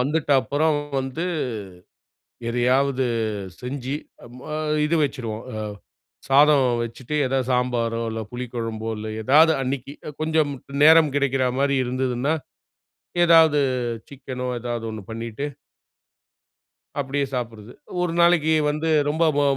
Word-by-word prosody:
வந்துட்டப்புறம் 145 +1 +2 0.2
வந்து, 135 +6 -3 1.2
எதையாவது 130 +2 +2 0.6
செஞ்சு, 130 +1 -4 0.3
அம் 120 +1 -13
அ - - -2 0.3
இது 155 +3 +1
வச்சுருவோம். 115 -6 -4
அ - - -5 0.7
சாதம் 140 0 +6 0.2
வச்சுட்டு, 120 +4 -6
ஏதாவது 130 -1 -1
சாம்பாரோ, 120 -2 0
இல்ல, 110 - -4
புளிக்கொழம்போ, 115 -3 -4
இல்ல 110 - -5
ஏதாவது. 155 +7 +6
அன்னைக்கு 135 +1 -4
அ 150 - -6
கொஞ்சம் 155 -2 +1 0.3
நேரம் 160 -2 +7
கிடைக்கிற 135 -2 +1
மாரி 140 0 +2
இருந்ததுன்னா, 130 +3 0 0.9
ஏதாவது 160 -3 +6 0.5
சிக்கனோ, 130 -2 -6
எதாவது 120 -1 -4
ஒண்ணு 110 -1 -7
பண்ணிட்டு 115 +4 -4 1.5
அப்டியே 140 +1 -1
சாப்பிடுறது, 115 -3 -5 0.3
ஒரு 180 -2 0
நாளைக்கு 170 -2 +4 0.2
வந்து 155 +2 -2 0.2
ரொம்ப 160 +3 +1
போ 145 - +3
135 Hz, 110 wpm, -23 LUFS, 120-150 Hz, 1.5 s, நேரம்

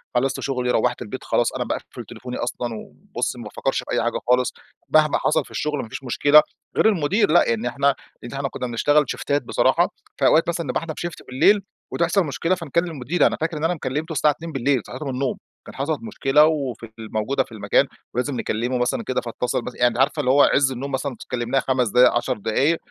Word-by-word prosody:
خلصت 135 +2 +1
شغلي، 125 -2 -1
روَّحت 125 0 +1
البيت، 105 - -6
خلاص - - +1
أنا - - -2
باقفل - - -6
تليفوني 125 0 -7
أصلًا، 120 0 -3
وبُصّي - - -5
ما - - -7
بافكرش - - -2
في - - -9
أي - - +1
حاجة - - -1
خالص، 125 0 +3 0.4
مهما 155 -1 +4
حصل - - +1
في - - -17
الشغل، 150 -1 -2
ما 110 - -9
فيش 135 - -7
مشكلة. 145 +4 +5 0.3
غير - - +5
المدير 195 +1 +2
لأ، 175 - +5
يعني 115 +1 0
إحنا 140 +3 +1 0.3
إن 120 - -8
إحنا 135 0 -2
كنّا 125 - -4
بنشتغل 145 +6 +3
شيفتات 145 -2 -1
بصراحة، - - +2 0.3
فأوقات 160 - +4
مثلًا 170 -2 -2
نبقى 125 - -1
إحنا 165 -1 -5
في - - -8
شيفت 175 -2 -6
بالليل، 200 +11 +4 0.3
وتحصل 170 +2 +1
مشكلة 165 +5 0
فنكلم 170 0 -1
المدير. 155 +4 +1
أنا - - -2
فاكر 160 0 -1
إن 150 - -5
أنا 165 +2 +2
م - - -7
كلِّمتُه 150 +4 -3
الساعة 150 0 +3
2:00 165 +3 -8
بالليل، 135 -3 +1
صحيته 130 +4 -7
من 135 - -2
النوم؛ 130 0 -1 0.3
كان - - -11
حصلت 145 +3 -2
مشكلة 150 -9 +3
وفي 140 -7 -1
ال 110 - -9
موجودة 130 +5 0
في - - -22
المكان، 110 -2 +2 0.3
ولازم 130 +3 -1
نكلمه 120 +2 -1
مثلًا 125 0 0
كده 130 - -1
فاتصل، 120 +1 -2
بس - - -7 0.2
عارفة 135 +4 +2
اللي 130 -3 +2
هوّ 145 - +5
عز 140 -1 +3
النوم 135 +3 -5
مثلًا 135 -1 -2 0.2
كلمناه 125 +2 0
5 130 -3 +1
دقايق، 125 +5 +6
10 125 +1 -1
دقايق، 135 +10 +1
135 Hz, 215 wpm, -22 LUFS, 125-155 Hz, 0.4 s, دقايق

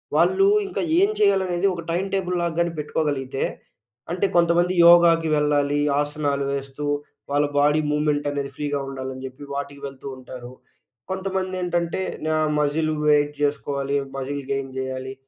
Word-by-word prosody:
వాళ్ళు 390 +1 +4 0.2
ఇంకా 380 - -3 0.2
ఏం 395 +2 +4
చేయాలనేది 190 -2 +2
ఒక 170 - -5
టైమ్ 180 +3 0
టేబుల్‌లాగా 180 -3 -1
గాని 170 0 +1
పెట్టుకోగలిగితే 145 -3 -2 0.7
అంటే 180 +3 0
కొంతమంది 175 +1 +3
యోగాకి 170 -1 +6
వెళ్ళాలి. 145 -1 +2 0.2
ఆసనాలు 145 -1 -1
వేస్తూ 140 +1 -5 0.5
వాళ్ళ 145 +1 +3
బాడీ 150 +2 +4
మూవ్‌మెంట్ 150 -1 0
అనేది 140 -1 -3
ఫ్రీగా 145 -1 -2
ఉండాలని 130 -1 -6
జెప్పి, 130 +2 -9
వాటికి 140 0 -5
వెళ్తూ 135 0 -10
ఉంటారు. 125 -1 -10 0.6
కొంతమందేంటంటే 185 -2 -2 0.3
నా 155 - +1 0.2
మజిల్ 155 +2 +1 0.2
వెయిట్ 145 0 +3
చేసుకోవాలి. 140 -1 -1 0.2
మజిల్ 140 +1 -3
గెయిన్ 135 -1 -2
జేయాలి. 130 0 -4
150 Hz, 130 wpm, -23 LUFS, 140-175 Hz, 0.7 s, యోగాకి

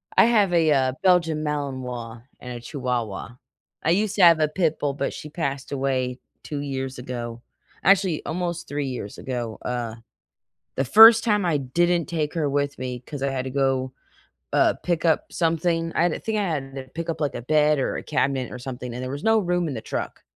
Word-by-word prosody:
I - - +7
have 210 -6 +3
a, 160 -2 +4
uh, 130 -2 +2
Belgian 165 -4 +3
Malinois 125 -6 -4 0.2
and 125 0 -7
a 120 - -7
Chihuahua. 120 -5 -4 0.5
I 160 - +1
used 205 +2 +1
to 195 - +4
have 170 -2 +8
a 155 - +3
pit 160 0 0
bull, 145 -1 0
but 140 0 -2
she 150 - -8
passed 140 -4 -4
away 130 -2 -1 0.2
2 145 -2 -5
years 135 -2 -4
ago, 120 -2 -6 0.4
actually, 190 -4 +3
almost 175 0 -3
3 145 -1 -2
years 120 -6 -6
ago, 120 -4 -4
uh. 120 -2 -3 0.8
The 135 - +1
first 225 - +9
time 210 -5 +1
I 155 -4 +2
didn't 170 +6 +1
take 155 -1 -2
her 150 -4 0
with 145 -1 -1
me 125 -1 -4
'cause 135 +3 -8
I 140 - +1
had 130 -1 -2
to 130 - -4
go, 130 -1 0 0.6
uh, - - +4
pick 170 -1 0
up 160 - +1
something 165 0 0
I - - +2
had 175 - +4
to - - -2
I - - -7
think 220 -1 -3
I - - +1
had 140 -7 -3
to 135 - -5
pick 165 +5 -7
up, 165 - -2
like, 145 -3 -1
a - - -4
bed 150 +2 +3
or 135 - -1
a - - -5
cabinet 130 -2 -1
or 125 - -6
something, 125 -1 -6
and 125 +2 -5
there 130 - -4
was 140 +2 -6
no 225 0 +4
room 175 -3 0
in - - -3
the 110 - -4
truck, - - -5
145 Hz, 215 wpm, -24 LUFS, 130-170 Hz, 0.8 s, first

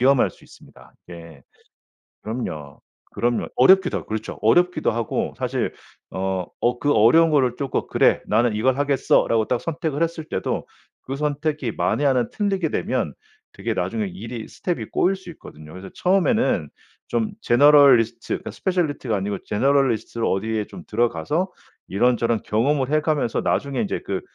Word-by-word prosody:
위험할 130 +1 +4
수 - - -22
있습니다. - - -18 0.2
이게 85 -4 -12 0.8
그럼요. 80 - -6 0.3
그럼요. 120 0 0
어렵기도 190 +7 +5
하고 - - -11
그렇죠 110 0 -5
어렵기도 175 +10 +3
하고 115 -1 -2
사실 - - -2 0.4
어 95 -1 -2 0.2
어 120 0 +1
그 145 0 +2
어려운 125 +10 +5
거를 130 -5 +2
쪼끔 140 -2 -2
'그래 - - +3
나는 115 +1 +2
이걸 130 +5 +1
하겠어.'라고 135 -5 +2
딱 125 - 0
선택을 160 -2 -2
했을 165 -1 -2
때도 - - -3 0.4
그 135 - -5
선택이 150 -3 -2
만에 90 +12 0
하나 125 -4 +2
틀리게 195 -5 -1
되면 - - -2 0.4
되게 - - -3
나중에 220 -2 -2
일이 125 - -7
스텝이 175 -2 -4
꼬일 190 +2 +1
수 190 -2 -11
있거든요. 75 - -13
그래서 95 +2 -9
처음에는 190 - +1 0.4
좀 115 -2 -1
generalist 125 -3 +5
그러니까 - - -3
specialist가 155 - -1
아니고 100 0 -3
generalist로 125 -1 +1
어디에 110 +2 -1
좀 - - -11
들어가서 120 - -1 0.4
이런저런 115 +1 +1
경험을 130 +5 0
해 155 - +3
가면서 150 -7 0
나중에 140 -1 -1
이제 205 - -2
그 95 -1 -2
125 Hz, 405 characters per minute, -22 LUFS, 110-155 Hz, 0.8 s, 어렵기도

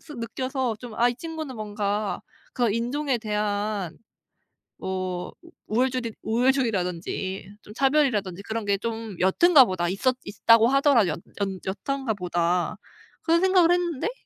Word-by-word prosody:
스 300 - -12
느껴서 255 +1 -2
좀 240 -3 -8
'아 240 +1 +4
이 245 - -2
친구는 315 -3 -6
뭔가 205 -1 -2 0.3
그 240 -4 +1
인종에 250 +3 -1
대한 210 -4 -2 0.8
뭐 185 -1 -4 0.4
우월주디 245 0 0
우월주의라든지 200 -6 -1
좀 210 - -13
차별이라든지 250 - +1
그런 220 0 -4
게 200 -1 +2
좀 225 -2 -5
옅은가 270 - +6
보다. 175 -3 -1
있었 255 +7 +1
있다고 225 +3 +4
하더라도 275 -7 +4
옅 - - -3 0.2
연 195 -2 -2 0.3
옅은가 270 -5 -1
보다.' 175 0 0 0.5
그런 335 +1 +3
생각을 370 -2 +5
했는데 350 - 0
225 Hz, 295 characters per minute, -25 LUFS, 200-265 Hz, 0.8 s, 옅은가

